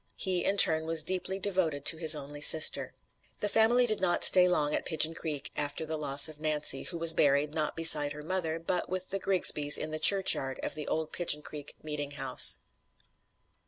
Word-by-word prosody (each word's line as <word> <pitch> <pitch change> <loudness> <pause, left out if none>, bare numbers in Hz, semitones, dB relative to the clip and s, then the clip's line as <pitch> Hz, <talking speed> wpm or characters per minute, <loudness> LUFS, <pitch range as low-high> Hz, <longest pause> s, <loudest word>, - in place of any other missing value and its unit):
He, 185 -2 -4
in 200 - -3
turn, 160 -3 +6
was 165 -1 +1
deeply 185 +2 -4
devoted 180 -7 -5
to 165 - +3
his 160 -1 +4
only 145 0 -11
sister. 155 +1 +5 0.4
The 210 - -4
family 225 +4 +1
did 215 -4 -4
not 180 -2 -2
stay 180 -1 +6
long 150 -4 -3
at - - -4
Pigeon 160 -1 -1
Creek 150 -4 -8
after 145 +2 -6
the 160 0 -6
loss 145 -1 +1
of 155 -1 -14
Nancy, 150 -3 -1
who 175 - -8
was 165 0 +5
buried, 145 0 -2
not 155 -2 -5
beside 155 -3 +4
her 150 0 -13
mother, 165 -1 -5
but 170 +2 -5
with 185 +1 -7
the 195 - -5
Grigsbys 155 -7 +2
in 155 - -8
the 155 - -7
churchyard 155 -7 +2
of - - -5
the 150 -1 -9
old 160 -1 -6
Pigeon 150 -4 -4
Creek 145 -1 -12
meeting 150 -2 -8
house. 135 - 0
160 Hz, 195 wpm, -26 LUFS, 150-180 Hz, 0.4 s, turn